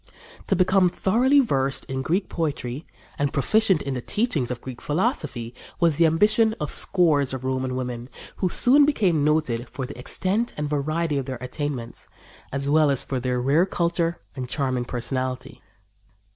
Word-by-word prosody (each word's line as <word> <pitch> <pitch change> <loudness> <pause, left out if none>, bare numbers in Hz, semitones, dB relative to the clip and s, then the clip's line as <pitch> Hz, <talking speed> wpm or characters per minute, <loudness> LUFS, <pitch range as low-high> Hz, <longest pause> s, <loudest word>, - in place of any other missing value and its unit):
To 195 - +2
become 185 0 +4
thoroughly 245 +11 +3
versed 135 - -1
in 130 0 -3
Greek 180 +8 0
poetry 145 -4 -3 0.4
and 145 -1 +1
proficient 190 - +2
in 140 - -3
the 125 - -3
teachings 165 - -1
of 125 -1 -4
Greek 125 -1 -9
philosophy 150 - -2 0.3
was 165 -4 +3
the 170 - +5
ambition 215 +7 +3
of 150 - -3
scores 150 -8 +2
of 130 - -7
Roman 130 -1 -1
women, 125 -1 -4 0.3
who 185 - 0
soon 265 +10 +5
became 195 - +2
noted 150 -6 0
for 135 - -5
the 125 - -9
extent 195 - -1
and 150 0 -2
variety 150 +1 -1
of 135 - -5
their 130 -2 -4
attainments, 130 -2 -5 0.4
as 140 +1 -2
well 155 +1 +4
as 135 -2 0
for 130 - -3
their 125 0 -1
rare 145 +9 +3
culture 170 -1 0 0.2
and 130 -2 -5
charming 130 -4 -1
personality. 130 +1 -3
145 Hz, 165 wpm, -24 LUFS, 130-175 Hz, 0.4 s, the